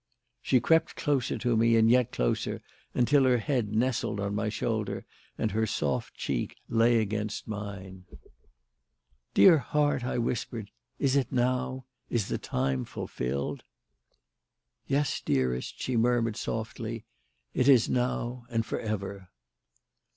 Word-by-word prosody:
She 130 Hz, -, +3 dB
crept 160 Hz, +7 st, +2 dB
closer 135 Hz, -4 st, 0 dB
to 120 Hz, -2 st, +1 dB
me 115 Hz, +1 st, +4 dB
and 110 Hz, 0 st, +5 dB
yet 125 Hz, 0 st, +4 dB
closer, -, -, -1 dB, 0.3 s
until 135 Hz, +3 st, +4 dB
her 125 Hz, -1 st, +4 dB
head 120 Hz, -4 st, -1 dB
nestled 115 Hz, -3 st, 0 dB
on 100 Hz, 0 st, -2 dB
my 105 Hz, +1 st, -1 dB
shoulder 110 Hz, -1 st, -2 dB, 0.3 s
and 110 Hz, -, 0 dB
her 110 Hz, +2 st, +1 dB
soft -, -, -2 dB
cheek -, -, -3 dB
lay 115 Hz, +1 st, +4 dB
against 105 Hz, 0 st, -2 dB
mine. 100 Hz, -3 st, -7 dB, 1.3 s
"Dear 170 Hz, -5 st, +8 dB
heart," 145 Hz, +1 st, +1 dB
I 125 Hz, -, -2 dB
whispered, 115 Hz, -3 st, -3 dB, 0.3 s
"is 135 Hz, -1 st, +1 dB
it 135 Hz, -4 st, +1 dB
now? 130 Hz, +1 st, 0 dB, 0.2 s
Is 115 Hz, -5 st, -1 dB
the -, -, -1 dB
time 65 Hz, 0 st, -1 dB
fulfilled?" 65 Hz, +3 st, -4 dB, 1.2 s
"Yes, 140 Hz, 0 st, 0 dB
dearest," 65 Hz, -2 st, -1 dB
she 130 Hz, -, -2 dB
murmured 115 Hz, -1 st, +2 dB
softly. 110 Hz, 0 st, -4 dB, 0.5 s
"It 130 Hz, -, +2 dB
is 125 Hz, -5 st, +6 dB
now 125 Hz, 0 st, -1 dB
and 115 Hz, -2 st, 0 dB
for -, -, -3 dB
ever." 100 Hz, -3 st, -4 dB
115 Hz, 130 wpm, -29 LUFS, 105-125 Hz, 1.3 s, Dear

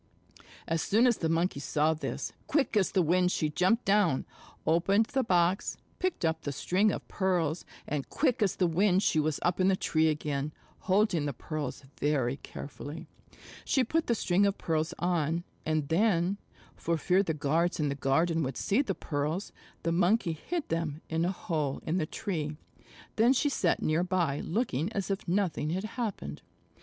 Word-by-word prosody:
As 165 Hz, 0 st, 0 dB
soon 225 Hz, +5 st, +3 dB
as 240 Hz, -3 st, +4 dB
the 160 Hz, -, 0 dB
Monkey 165 Hz, -2 st, +1 dB
saw 150 Hz, +2 st, +1 dB
this, 155 Hz, -, -4 dB
quick 285 Hz, -6 st, +1 dB
as 200 Hz, -3 st, +3 dB
the 185 Hz, -, +3 dB
wind 180 Hz, +2 st, +3 dB
she 155 Hz, -, 0 dB
jumped 190 Hz, +9 st, +2 dB
down, 195 Hz, -9 st, +3 dB, 0.4 s
opened 195 Hz, +7 st, +3 dB
the 265 Hz, +3 st, 0 dB
box, 180 Hz, -2 st, +1 dB, 0.2 s
picked 365 Hz, -, -1 dB
up 160 Hz, 0 st, 0 dB
the 145 Hz, -, -3 dB
string 190 Hz, +9 st, +2 dB
of -, -, -5 dB
pearls, 175 Hz, -4 st, 0 dB, 0.2 s
and 145 Hz, -2 st, -3 dB
quick 255 Hz, -5 st, +1 dB
as 195 Hz, -3 st, +2 dB
the 185 Hz, -, +2 dB
wind 185 Hz, +3 st, +3 dB
she 155 Hz, -, +2 dB
was 155 Hz, -1 st, 0 dB
up 175 Hz, +1 st, +1 dB
in 185 Hz, -, +4 dB
the 195 Hz, -, +4 dB
tree 160 Hz, -3 st, +1 dB
again, 150 Hz, -1 st, -1 dB, 0.3 s
holding 190 Hz, -5 st, +2 dB
the 140 Hz, -, -2 dB
pearls 150 Hz, +1 st, -5 dB, 0.2 s
very 135 Hz, -3 st, +1 dB
carefully. 145 Hz, +3 st, -8 dB, 0.6 s
She 265 Hz, -, +2 dB
put 325 Hz, +7 st, 0 dB
the 235 Hz, -, +2 dB
string 190 Hz, -2 st, +2 dB
of 200 Hz, -, -1 dB
pearls 160 Hz, -1 st, -1 dB
on, 170 Hz, -1 st, 0 dB, 0.2 s
and 155 Hz, -2 st, 0 dB
then, 185 Hz, +2 st, +2 dB, 0.4 s
for 170 Hz, 0 st, -1 dB
fear 180 Hz, +5 st, +3 dB
the 165 Hz, -6 st, -1 dB
guards 165 Hz, +5 st, +1 dB
in 150 Hz, -1 st, +1 dB
the -, -, 0 dB
garden 160 Hz, +5 st, +1 dB
would 135 Hz, -3 st, -3 dB
see 210 Hz, +7 st, +2 dB
the 200 Hz, -10 st, -2 dB
pearls, 150 Hz, +6 st, -2 dB, 0.3 s
the 165 Hz, -, +1 dB
Monkey 180 Hz, +1 st, +2 dB
hid 330 Hz, -, -4 dB
them 165 Hz, -2 st, -2 dB
in 165 Hz, +1 st, 0 dB
a 180 Hz, -, +1 dB
hole 155 Hz, -7 st, -2 dB
in 170 Hz, +4 st, 0 dB
the 155 Hz, -, -1 dB
tree. 155 Hz, -8 st, -3 dB, 0.6 s
Then 235 Hz, +4 st, +5 dB
she 290 Hz, +3 st, +2 dB
sat 185 Hz, -10 st, +1 dB
near 155 Hz, +3 st, +2 dB
by 175 Hz, -6 st, 0 dB
looking 175 Hz, -, -1 dB
as 200 Hz, -1 st, -2 dB
if 195 Hz, -, -3 dB
nothing 175 Hz, -4 st, 0 dB
had 185 Hz, +4 st, -1 dB
happened. 220 Hz, -1 st, -4 dB
170 Hz, 180 wpm, -30 LUFS, 155-195 Hz, 0.6 s, Then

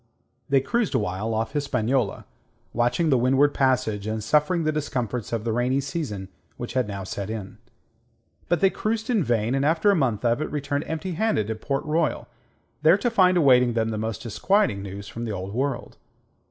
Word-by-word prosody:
They 135 Hz, -1 st, +4 dB
cruised 235 Hz, -, 0 dB
awhile 105 Hz, +2 st, -1 dB
off 110 Hz, 0 st, -1 dB
Hispaniola, 130 Hz, -5 st, -1 dB, 0.5 s
watching 120 Hz, +7 st, +1 dB
the 130 Hz, -, +4 dB
Windward 135 Hz, +4 st, +3 dB
Passage, 115 Hz, -6 st, +1 dB
and 110 Hz, 0 st, -2 dB
suffering 150 Hz, -, +2 dB
the 155 Hz, -, +1 dB
discomforts 125 Hz, -7 st, -3 dB
of 115 Hz, -2 st, -2 dB
the 115 Hz, -1 st, -1 dB
rainy 125 Hz, +3 st, +1 dB
season 135 Hz, -, -4 dB, 0.3 s
which 120 Hz, -, -6 dB
had 130 Hz, -4 st, +1 dB
now 100 Hz, -1 st, -5 dB
set 100 Hz, +1 st, -5 dB
in. 105 Hz, -2 st, -6 dB, 0.9 s
But 175 Hz, -, +1 dB
they 195 Hz, -, +5 dB
cruised 220 Hz, +2 st, -2 dB
in 215 Hz, -7 st, +2 dB
vain, 115 Hz, -2 st, 0 dB
and 135 Hz, 0 st, +1 dB
after 160 Hz, +7 st, +3 dB
a -, -, +3 dB
month 125 Hz, -, 0 dB
of 120 Hz, +4 st, +2 dB
it, 155 Hz, -, -2 dB
returned 145 Hz, 0 st, -2 dB
empty 160 Hz, +4 st, -3 dB
handed 170 Hz, -, 0 dB
to 110 Hz, -, -1 dB
Port 135 Hz, +5 st, -3 dB
Royal, 155 Hz, 0 st, 0 dB, 0.5 s
there 160 Hz, +5 st, +6 dB
to 240 Hz, +3 st, -1 dB
find 185 Hz, -4 st, +4 dB
awaiting 125 Hz, -6 st, +5 dB
them 115 Hz, -1 st, 0 dB
the 110 Hz, -1 st, -3 dB
most 115 Hz, +5 st, -4 dB
disquieting 120 Hz, -, +1 dB
news 100 Hz, 0 st, -7 dB
from 115 Hz, +1 st, -6 dB
the 110 Hz, -, -3 dB
Old 95 Hz, +1 st, -5 dB
World. 130 Hz, 0 st, -2 dB
130 Hz, 190 wpm, -25 LUFS, 110-155 Hz, 0.9 s, there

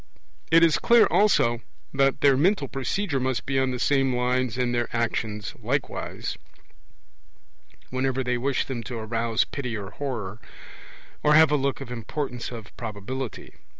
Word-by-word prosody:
It 165 Hz, +1 st, +6 dB
is 165 Hz, -2 st, +4 dB
clear, 235 Hz, -1 st, +6 dB
also, 120 Hz, -, +3 dB, 0.3 s
that 135 Hz, 0 st, +2 dB
their 140 Hz, -2 st, +6 dB
mental 160 Hz, +1 st, +2 dB
procedure 140 Hz, +4 st, -2 dB
must 130 Hz, -1 st, -1 dB
be 135 Hz, -1 st, +1 dB
on 130 Hz, 0 st, +1 dB
the 125 Hz, -, -2 dB
same 135 Hz, 0 st, +2 dB
lines 125 Hz, -1 st, 0 dB
in 125 Hz, -1 st, +1 dB
their 120 Hz, -1 st, 0 dB
actions 110 Hz, -3 st, -2 dB
likewise, -, -, -3 dB, 1.5 s
whenever 130 Hz, +1 st, 0 dB
they 125 Hz, -1 st, 0 dB
wish 135 Hz, +1 st, 0 dB
them 125 Hz, -3 st, -4 dB
to 120 Hz, +2 st, -5 dB
arouse 115 Hz, +1 st, 0 dB
pity 125 Hz, -5 st, -4 dB
or 100 Hz, -1 st, -7 dB
horror, 115 Hz, -7 st, -5 dB, 0.8 s
or 150 Hz, 0 st, +4 dB
have 160 Hz, -1 st, +7 dB
a -, -, +4 dB
look 140 Hz, -1 st, -1 dB
of 130 Hz, -3 st, -7 dB
importance 125 Hz, +1 st, -4 dB
or 115 Hz, -2 st, -6 dB
probability. 115 Hz, +2 st, -6 dB
130 Hz, 150 wpm, -25 LUFS, 120-140 Hz, 1.5 s, have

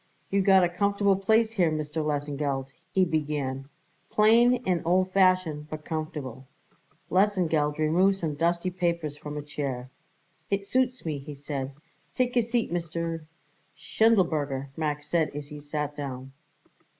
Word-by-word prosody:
"You 200 Hz, 0 st, +3 dB
got 190 Hz, -1 st, +6 dB
a -, -, +4 dB
comfortable 200 Hz, +2 st, +2 dB
place 220 Hz, +4 st, +3 dB
here, 185 Hz, -7 st, +2 dB
Mr. 155 Hz, 0 st, -2 dB
Lesengeld," 145 Hz, -2 st, -2 dB, 0.2 s
he 190 Hz, -1 st, +3 dB
began, 145 Hz, -4 st, -2 dB, 0.4 s
"plain 235 Hz, +3 st, +5 dB
and 180 Hz, -2 st, +1 dB
old 185 Hz, +2 st, +2 dB
fashioned, 185 Hz, -6 st, +2 dB
but 155 Hz, 0 st, -7 dB
comfortable." 150 Hz, -5 st, -5 dB, 0.6 s
Lesengeld 175 Hz, -6 st, +2 dB
removed 175 Hz, +6 st, +3 dB
some 160 Hz, -5 st, -2 dB
dusty 170 Hz, +4 st, 0 dB
papers 170 Hz, -4 st, -1 dB
from 150 Hz, 0 st, -7 dB
a 145 Hz, -, -4 dB
chair. 135 Hz, -4 st, -4 dB, 0.6 s
"It 200 Hz, 0 st, -1 dB
suits 255 Hz, +1 st, 0 dB
me," 150 Hz, -3 st, -2 dB
he 145 Hz, +1 st, -8 dB
said. 140 Hz, -1 st, -5 dB, 0.4 s
"Take 250 Hz, -1 st, 0 dB
a 240 Hz, -, +5 dB
seat, 235 Hz, -4 st, -1 dB
Mr. 165 Hz, -1 st, -3 dB, 0.2 s
" -, -, -38 dB
"Schindelberger," 155 Hz, -11 st, +1 dB
Max 150 Hz, -2 st, -2 dB
said 160 Hz, -1 st, +1 dB
as 145 Hz, 0 st, -6 dB
he 150 Hz, -1 st, -8 dB
sat 150 Hz, 0 st, -4 dB
down. 135 Hz, -2 st, -6 dB
160 Hz, 145 wpm, -27 LUFS, 145-190 Hz, 0.6 s, got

